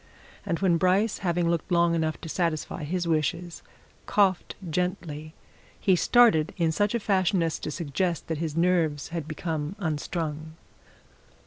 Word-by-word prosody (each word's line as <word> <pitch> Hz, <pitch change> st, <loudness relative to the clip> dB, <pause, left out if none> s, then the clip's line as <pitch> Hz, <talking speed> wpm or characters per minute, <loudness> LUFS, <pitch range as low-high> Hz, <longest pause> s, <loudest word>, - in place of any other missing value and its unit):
And 170 Hz, -3 st, 0 dB
when 180 Hz, -3 st, +3 dB
Bryce, 190 Hz, +5 st, +2 dB
having 175 Hz, -2 st, 0 dB
looked 170 Hz, +2 st, -1 dB
long 170 Hz, -1 st, +4 dB
enough 160 Hz, -2 st, -1 dB
to -, -, -7 dB
satisfy 165 Hz, -2 st, -2 dB
his 175 Hz, +2 st, -2 dB
wishes, 165 Hz, +2 st, -1 dB, 0.5 s
coughed 195 Hz, -3 st, +2 dB
gently, 160 Hz, -3 st, -3 dB, 0.4 s
he 190 Hz, -, +3 dB
started 180 Hz, -6 st, +4 dB
in 165 Hz, -2 st, +2 dB
such 205 Hz, +6 st, +1 dB
a -, -, +1 dB
fashion 190 Hz, -3 st, +2 dB
as 165 Hz, -1 st, -1 dB
to -, -, -4 dB
suggest 170 Hz, +2 st, -2 dB
that 160 Hz, -2 st, -3 dB
his 160 Hz, -1 st, -3 dB
nerves 165 Hz, -5 st, +1 dB
had 165 Hz, -3 st, -4 dB
become 155 Hz, +1 st, -3 dB
unstrung. 155 Hz, -2 st, -3 dB
170 Hz, 145 wpm, -27 LUFS, 155-185 Hz, 0.5 s, long